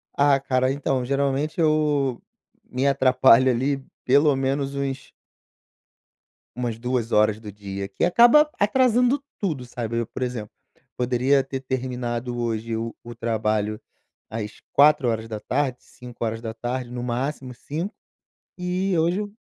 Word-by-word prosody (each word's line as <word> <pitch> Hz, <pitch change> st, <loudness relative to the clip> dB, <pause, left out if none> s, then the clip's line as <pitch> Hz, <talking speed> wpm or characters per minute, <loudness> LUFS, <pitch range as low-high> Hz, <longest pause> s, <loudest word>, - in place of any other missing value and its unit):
Ah, 140 Hz, -1 st, +4 dB
cara, 130 Hz, -1 st, +1 dB
então, 135 Hz, -2 st, -1 dB
geralmente, 140 Hz, +4 st, -1 dB
eu 150 Hz, -5 st, +2 dB, 0.5 s
me 130 Hz, +2 st, -1 dB
atrapalho, 130 Hz, -2 st, +5 dB
ali, 135 Hz, +3 st, -1 dB, 0.2 s
pelo 140 Hz, +2 st, +4 dB
menos 135 Hz, +1 st, -1 dB
uns 135 Hz, -1 st, -4 dB, 1.4 s
umas 120 Hz, -3 st, -3 dB
2 120 Hz, -1 st, -2 dB
horas 105 Hz, 0 st, +3 dB
do 105 Hz, -2 st, -9 dB
dia, 100 Hz, -1 st, -6 dB
que 95 Hz, -, 0 dB
acaba 240 Hz, -, +6 dB
atrasando 250 Hz, +4 st, +3 dB, 0.2 s
tudo, 155 Hz, -11 st, -2 dB
sabe, 115 Hz, -1 st, -3 dB
eu, 115 Hz, -, -1 dB
por -, -, -8 dB
exemplo, 120 Hz, -4 st, -3 dB, 0.4 s
poderia 125 Hz, +3 st, +2 dB
ter 135 Hz, 0 st, -5 dB
terminado 125 Hz, -2 st, -3 dB
hoje 115 Hz, -1 st, -2 dB
o 115 Hz, +1 st, -4 dB
o 120 Hz, 0 st, -9 dB
trabalho 110 Hz, -2 st, -1 dB, 0.5 s
às 110 Hz, -1 st, -6 dB
16:00, 125 Hz, -2 st, +2 dB
17:00, 120 Hz, +1 st, -5 dB
no 125 Hz, 0 st, -4 dB
máximo 125 Hz, +2 st, -3 dB
17:00, 165 Hz, -, -5 dB, 0.7 s
e 180 Hz, +1 st, -1 dB
hoje, 170 Hz, +4 st, +2 dB
eu 205 Hz, -1 st, -5 dB
130 Hz, 125 wpm, -24 LUFS, 115-140 Hz, 1.4 s, acaba